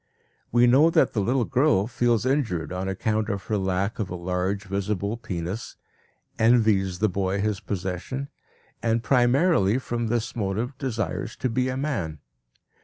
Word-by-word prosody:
We 120 +1 +5
know 135 +7 +6
that - - +3
the 110 - 0
little 120 +4 +1
girl 130 -6 +3
feels 120 0 +1
injured 115 - 0
on 95 +1 -3
account 105 +3 -1
of 100 -3 -3
her 110 - -1
lack 95 +3 -1
of 105 -4 -2
a 90 - -4
large, 90 +3 -2
visible 100 +2 -2
penis, 95 0 -5 0.6
envies 110 -5 +3
the 110 - +2
boy 95 0 -1
his 105 -1 0
possession, 95 +10 -4 0.5
and 115 0 +1
primarily 125 - +3
from 120 -3 -2
this 120 +2 -1
motive 110 +5 -2
desires 115 -9 -3
to 130 - -2
be 125 +3 0
a 130 - -2
man. 100 - -2
110 Hz, 155 wpm, -25 LUFS, 95-120 Hz, 0.6 s, know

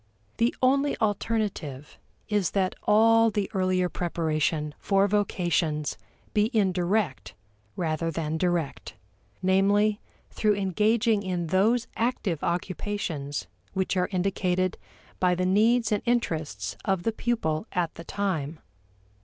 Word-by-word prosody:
The 235 +1 +2
only 275 +2 +3
alternative 205 - -2 0.3
is 205 -5 +1
that 185 -1 +1
all 225 +2 +5
the 205 -2 -2
earlier 185 -1 +1
preparation 155 -3 -1
for 195 0 +2
vocations 175 -7 0 0.4
be 210 +1 +3
indirect 180 - 0 0.4
rather 165 -1 -1
than 160 0 -2
direct; 175 -10 -1 0.5
namely, 200 +3 +3 0.3
through 210 -1 +2
engaging 210 +3 +2
in 180 -3 -2
those 225 +5 +3
active 225 - -1
occupations 170 -5 -3 0.3
which 190 0 0
are 180 -1 +1
indicated 185 -1 0 0.4
by 180 -1 +3
the 180 +1 0
needs 220 +4 +3
and 210 - +1
interests 155 - -1
of 190 -3 0
the 225 - +1
pupil 220 -6 -1
at 175 -2 -1
the 165 - -9
time. 165 -6 -2
190 Hz, 115 wpm, -27 LUFS, 165-210 Hz, 0.5 s, all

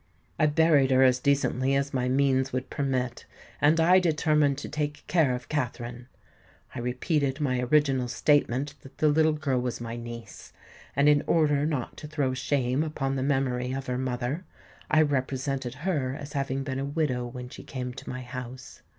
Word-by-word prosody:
I 155 - +5
buried 150 -3 +4
her 130 0 +5
as 125 -1 +4
decently 135 -1 +1
as 140 +1 -1
my 125 -1 0
means 135 0 +2
would 130 0 -3
permit; 130 -4 -2 0.3
and 155 +3 +4
I 180 +3 +6
determined 150 -4 +2
to - - -6
take 150 -1 -3
care 155 -8 +2
of 125 - -8
Katherine. 120 -4 -3 0.7
I 130 - -5
repeated 135 +3 -1
my 130 -4 0
original 130 -1 +2
statement 140 +2 +1
that 135 - -15
the 155 - +3
little 155 +1 +3
girl 140 -4 0
was 125 -1 -3
my 115 0 -5
niece; 115 -2 -9 0.4
and, 140 +2 +4
in 145 -1 +5
order 150 -3 +3
not 145 -6 -3
to 150 - -8
throw 145 -4 -1
shame 130 0 0
upon 135 -4 -2
the 135 - -1
memory 130 -2 0
of 135 0 -4
her 125 -1 -2
mother, 130 +5 -2 0.5
I 155 0 +5
represented 135 -2 -2
her 140 -8 0
as 145 0 -8
having 135 -1 -1
been 135 -1 -3
a 135 - -2
widow 140 -4 -1
when 125 0 -8
she - - -10
came 125 -1 -5
to - - -9
my 125 0 -5
house. 125 0 -8
135 Hz, 180 wpm, -27 LUFS, 125-145 Hz, 0.7 s, I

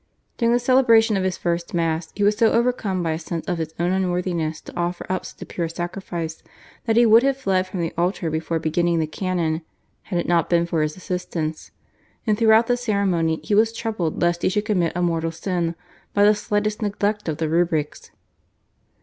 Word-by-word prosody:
During 235 -1 +2
the 240 - +4
celebration 235 -3 +4
of 190 - 0
his 190 -1 -1
first 170 0 -2
Mass 165 -1 -1
he 205 - -1
was 205 +1 +4
so 225 0 +3
overcome 225 -6 +1
by 165 - 0
a 160 - -2
sense 165 0 -5
of 175 -2 -1
his 160 0 -4
own 175 +1 +1
unworthiness 175 -4 -1
to - - -12
offer 175 0 -2
up 185 - -2
such - - -14
a - - -10
pure 170 -2 -3
sacrifice 175 -1 -5 0.5
that 225 - +2
he 240 - +6
would 225 +1 +7
have 270 0 +1
fled 190 -8 0
from 185 -1 -4
the 165 - -2
altar 175 -1 -1
before 160 +1 -1
beginning 170 +2 +1
the 160 - +1
canon 165 -1 -2 0.4
had 180 - -4
it 175 - -1
not 170 -2 +2
been 170 -1 +3
for 165 -2 -1
his 155 +2 -2
assistants, 170 -4 -4 0.6
and 215 -3 +2
throughout 220 +1 +5
the 245 +1 +1
ceremony 195 -8 0
he - - -2
was 220 +2 +4
troubled 220 -8 -3
lest 175 0 +1
he - - +2
should 205 +2 -1
commit 180 -6 +1
a 180 - 0
mortal 165 -1 0
sin 170 0 -2 0.4
by 205 - +4
the 210 +1 +6
slightest 210 +1 -1
neglect 205 -1 -1
of 155 - -2
the 160 - -1
rubrics. 160 -2 -1
180 Hz, 205 wpm, -22 LUFS, 165-210 Hz, 0.6 s, would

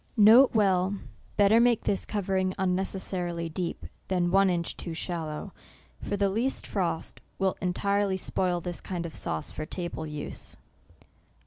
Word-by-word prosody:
N. 225 +6 +8
B* 195 -2 +2 0.4
Better 205 +2 +6
make 235 -1 +3
this 195 - 0
covering 190 -2 0
unneces 190 0 0
sarily 170 -4 -3
deep, 175 -1 -3 0.2
than 175 -2 +1
one 195 0 +5
inch 170 -2 -1
too 170 -2 -5
shallow; 160 -3 -4 0.5
for 205 - -2
the 200 0 +2
least 230 +7 0
frost 175 -5 -2 0.2
will 190 -1 +1
entirely 200 +2 +1
spoil 180 -1 0
this 175 0 -5
kind 175 -2 -4
of 165 - -6
sauce 80 -1 -2
for 155 - -6
table 175 -3 -5
use. 150 -1 -6
185 Hz, 145 wpm, -28 LUFS, 175-200 Hz, 0.5 s, N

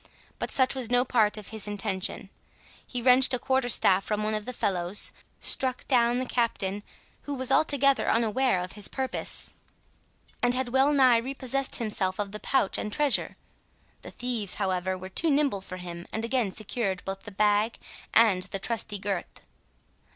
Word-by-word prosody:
But - - -3
such 260 -2 +2
was 255 -4 -2
no 245 +1 +2
part 220 -4 +2
of 210 - -9
his 220 -2 -2
intention. 200 -1 -3 0.6
He 245 -2 -4
wrenched 255 +1 +6
a - - -2
quarter 260 0 0
staff 195 -4 +4
from 210 +1 -2
one 215 0 -1
of 215 -1 -3
the 250 - -4
fellows, 190 -4 0 0.3
struck 255 -1 +1
down 240 -2 +3
the 255 - -2
Captain, 210 -5 -1 0.4
who 285 - -4
was 260 0 -2
altogether 275 -2 +3
unaware 230 -1 +1
of 180 +1 -6
his 210 -1 -1
purpose, 265 -1 -1 0.9
and 245 0 +2
had 260 -1 -1
well 265 +3 +3
nigh 260 -4 +5
repossessed 265 +1 0
himself 200 -5 0
of 205 -1 -3
the 210 - -7
pouch 240 -6 +1
and 210 - -4
treasure. 290 +2 +1 0.6
The - - -9
thieves, 230 -6 -1
however, 185 0 -1
were 185 0 -8
too 320 - +1
nimble 280 -9 +1
for 185 -1 -8
him, 175 -1 -8
and 220 +1 -3
again 235 -3 0
secured 195 -2 -3
both 195 0 -5
the 210 - -10
bag 210 +2 +1 0.3
and 215 -5 +4
the 195 - -4
trusty 215 0 -2
Gurth. 195 -2 -5
225 Hz, 175 wpm, -27 LUFS, 195-255 Hz, 0.9 s, wrenched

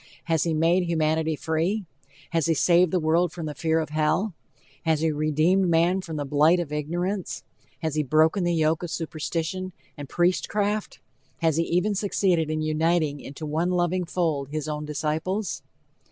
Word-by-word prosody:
Has 165 -1 +1
he 165 -2 0
made 165 +4 +3
humanity 160 -1 +1
free? 165 +7 -1 0.5
Has 165 -1 +1
he 165 - +2
saved 175 +3 +4
the 180 - +1
world 165 +2 +2
from 165 -1 -6
the 150 - -4
fear 160 +2 +1
of 155 -2 -3
hell? 155 +6 +1 0.5
Has 160 -2 +1
he 160 -1 +2
redeemed 155 +5 +2
man 170 +3 +3
from 165 -3 -7
the 145 -1 -2
blight 150 +5 +4
of 155 -4 -4
ignorance? 175 +6 -3 0.4
Has 160 -2 -1
he 155 - +1
broken 155 +6 +3
the 175 - +1
yoke 160 0 +2
of 175 - -4
superstition 165 +3 -3 0.2
and 145 -2 -8
priest 175 +1 +1
craft? 210 0 -1 0.5
Has 160 -2 +3
he 165 - +3
even 180 +5 +1
succeeded 185 -5 +1
in 155 0 -1
uniting 155 -1 +1
into 140 +4 -8
one 160 +4 0
loving 180 0 0
fold 160 -6 -1
his 155 0 -3
own 150 0 -3
disciples? 160 +7 -2
160 Hz, 175 wpm, -25 LUFS, 155-180 Hz, 0.5 s, saved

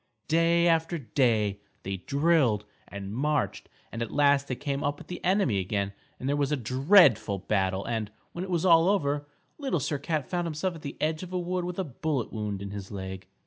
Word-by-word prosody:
Day 170 +1 +3
after 165 0 +2
day 115 -7 +1 0.2
they 95 0 -3
drilled 140 - +2 0.2
and 100 0 -7
marched, 145 +5 -1 0.2
and 115 - -5
at 115 - -2
last 140 -1 +3
they 130 - -2
came 140 +2 -3
up 145 +1 0
with - - -13
the 180 - -6
enemy 185 - +2
again 100 +1 -2 0.3
and 130 - -4
there 140 - +2
was 145 -1 0
a 150 - +2
dreadful 130 - +4
battle 95 0 0
and, 110 -3 -2 0.2
when 175 - -5
it 190 - -6
was 175 -1 0
all 165 0 +6
over, 145 -7 0 0.3
Little 270 - 0
Sir 145 +1 -2
Cat 150 -2 -2
found 175 -1 -1
himself 165 +3 -2
at 165 - -10
the 140 -2 -7
edge 155 0 0
of 185 0 -8
a 180 - 0
wood 180 0 -2
with 180 0 -5
a 190 - 0
bullet 145 - -3
wound 105 -3 -3
in 100 - -6
his 100 -1 -7
leg. 95 -1 -6
140 Hz, 210 wpm, -28 LUFS, 105-165 Hz, 0.3 s, all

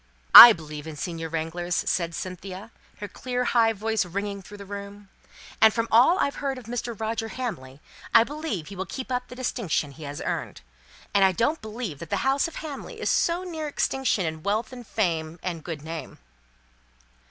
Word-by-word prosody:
"I 240 - +14
believe 155 -5 -6
in 160 - -7
senior 165 +1 -5
wranglers," 165 +2 -3
said 170 -2 -1
Cynthia, 185 +4 -7 0.3
her 205 - -6
clear 250 +5 -3
high 230 -2 +3
voice 220 0 -1
ringing 200 +2 -4
through 205 +2 -12
the 200 - -10
room. 200 0 -9 0.5
"And 220 - +8
from 230 0 0
all 250 +11 +6
I've 280 - 0
ever - - -6
heard 275 -2 -2
of 250 - -10
Mr. 235 -1 -5
Roger 225 0 -2
Hamley, 165 - -6 0.3
I 230 - +7
believe 280 - -5
he 200 - -9
will 190 +1 -5
keep 260 -1 -6
up 250 0 -2
the 250 - -10
distinction 230 - -2
he 155 +3 -12
has 145 0 -6
earned. - - -4 0.5
And 200 - +4
I 190 - +5
don't 265 - 0
believe 215 - -6
that 170 - -9
the 200 +3 -1
house 270 +4 +2
of 330 - -11
Hamley 295 -4 -7
is - - 0
so 345 +2 +1
near 320 -4 -5
extinction 265 -8 0
in 160 0 -4
wealth 215 +7 -1
and 245 -2 -10
fame, 165 -5 -1
and 170 -4 -4
good 160 -4 -6
name." 160 0 -7
205 Hz, 195 wpm, -25 LUFS, 170-245 Hz, 0.5 s, I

